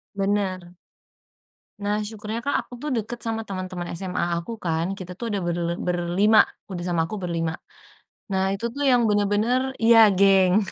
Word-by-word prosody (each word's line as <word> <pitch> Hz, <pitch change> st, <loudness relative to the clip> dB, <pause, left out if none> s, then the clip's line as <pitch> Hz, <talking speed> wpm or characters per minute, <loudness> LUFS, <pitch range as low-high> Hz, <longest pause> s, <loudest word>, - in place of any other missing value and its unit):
Benar. 195 Hz, -3 st, -1 dB, 1.1 s
Nah, 210 Hz, +1 st, -1 dB
syukurnya, 215 Hz, +2 st, -5 dB
Kak, 285 Hz, -, 0 dB
aku -, -, -14 dB
tuh 300 Hz, -, -3 dB
dekat 235 Hz, 0 st, -3 dB
sama 225 Hz, -1 st, -3 dB
teman-teman 185 Hz, -2 st, -5 dB
SMA 175 Hz, -1 st, -2 dB
aku 220 Hz, +7 st, -6 dB
kan. 165 Hz, -3 st, -1 dB
Kita 180 Hz, -2 st, -8 dB
tuh 230 Hz, +2 st, -4 dB
ada 205 Hz, -, -1 dB
berle 175 Hz, -1 st, -2 dB
berlima 180 Hz, +5 st, +3 dB, 0.3 s
udah 175 Hz, -2 st, -4 dB
sama 165 Hz, -2 st, 0 dB
aku 215 Hz, -, -5 dB
berlima 165 Hz, -2 st, -2 dB, 0.8 s
Nah 190 Hz, 0 st, +1 dB
itu 215 Hz, +4 st, -5 dB
tuh 285 Hz, +3 st, -1 dB
yang 245 Hz, -2 st, +4 dB
benar-benar 215 Hz, +6 st, +1 dB
iya 225 Hz, -1 st, +8 dB
geng. 195 Hz, +1 st, +5 dB
195 Hz, 155 wpm, -24 LUFS, 175-220 Hz, 1.1 s, iya